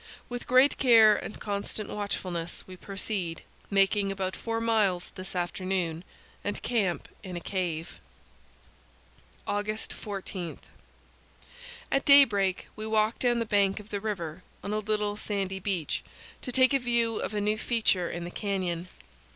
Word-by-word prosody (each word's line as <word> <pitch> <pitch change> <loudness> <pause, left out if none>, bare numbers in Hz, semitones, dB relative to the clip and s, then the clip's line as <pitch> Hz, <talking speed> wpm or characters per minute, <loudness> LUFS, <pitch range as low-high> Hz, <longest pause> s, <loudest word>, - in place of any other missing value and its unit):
With 245 0 -5
great 255 +3 +5
care 225 -4 +7
and 210 - -6
constant 205 0 -3
watchfulness 180 -4 -4
we 185 - -10
proceed, 190 -3 -3 0.3
making 195 0 +3
about 190 -1 -2
four 225 0 -2
miles 215 -6 +1
this 185 -1 -7
afternoon, 175 -1 -1 0.4
and 205 - -3
camp 205 -8 0
in 185 -3 -7
a - - -2
cave. 170 -3 -3 1.5
August 210 +1 -2
14 195 -4 -5 1.3
At 275 - +2
daybreak 210 -10 +5
we 215 0 -5
walk 220 +1 +2
down 245 -1 +2
the 230 - 0
bank 200 -1 +2
of 210 +1 -13
the 200 -1 -2
river, 185 -6 -3 0.2
on 200 - -3
a 215 - +1
little 210 -1 -1
sandy 195 -2 -2
beach, 185 -5 -1 0.4
to 250 - 0
take 260 +2 +4
a 275 - +4
view 235 -2 +1
of 215 - -3
a - - +1
new 210 +1 +1
feature 215 -8 +2
in 170 - -4
the 175 - -6
canyon. 185 -4 -2
200 Hz, 145 wpm, -29 LUFS, 185-220 Hz, 1.5 s, care